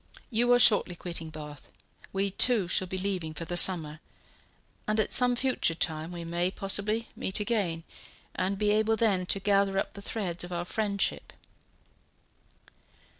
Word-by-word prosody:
You 240 +2 +2
are 245 - +6
shortly 210 -6 +5
quitting 170 -2 -5
Bath; 150 -2 -10 0.4
we, 195 0 -1
too, 215 -1 +2
shall 185 +1 -1
be 190 - -4
leaving 185 -5 -3
for 165 - -6
the 175 - -3
summer; 160 -4 +4 0.9
and 215 +1 0
at 215 - +1
some 250 -1 +6
future 250 -9 0
time 160 0 -2
we 175 -1 -7
may, 170 +2 -1
possibly, 205 +3 -1
meet 190 - -2
again, 205 -7 -2 0.5
and 190 +2 -2
be 210 0 +1
able 220 +1 +2
then 200 -5 0
to 195 - +2
gather 195 0 +1
up - - -2
the 200 - -10
threads 185 -5 -4
of 175 - -9
our 175 0 -3
friendship." 200 0 -2
195 Hz, 160 wpm, -28 LUFS, 175-215 Hz, 0.9 s, are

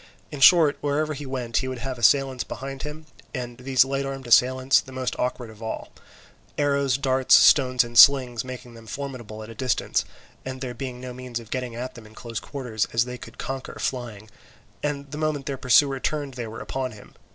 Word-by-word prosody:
In 145 - -6
short, 155 0 +6
wherever 150 +2 0
he 145 -1 -7
went 125 -3 -2
he 130 - 0
would 130 -1 -4
have 130 +1 -5
the - - -11
assailants 130 +2 +3
behind 135 +3 -7
him, 150 +1 -7 0.3
and 120 -2 -6
these 130 0 +3
light 135 +1 -2
armed 135 -1 -5
assailants, 130 +2 +4
the 130 - -13
most 130 -1 -3
awkward 125 -2 -2
of 110 0 -16
all; 110 - -5 0.7
arrows, 140 -3 +2
darts, 130 -2 +4
stones, 130 -4 +6
and 120 0 -10
slings 125 -2 +7
making 125 -1 -9
them 115 -1 -14
formidable 120 -4 -6
at 110 - -10
a - - -8
distance, 125 +2 0 0.4
and 130 0 -6
there 125 -2 -5
being 125 0 -6
no 125 0 -7
means 125 -1 -6
of 115 -2 -14
getting 125 -2 -3
at 125 +2 -5
them 115 -3 -12
at 110 - -18
close 115 -1 -5
quarters, 125 -7 -3
as 115 +1 +3
they 125 0 -7
could 115 +1 -12
conquer 135 0 -5
flying, 115 -5 -4 0.5
and 140 -1 -3
the 150 - -5
moment 155 -3 -1
their 140 - -2
pursuer 135 +1 +3
turned 145 -1 -2
they 120 -2 -5
were 110 +1 -8
upon 130 -2 -4
him. 105 - -15
130 Hz, 210 wpm, -24 LUFS, 120-135 Hz, 0.7 s, slings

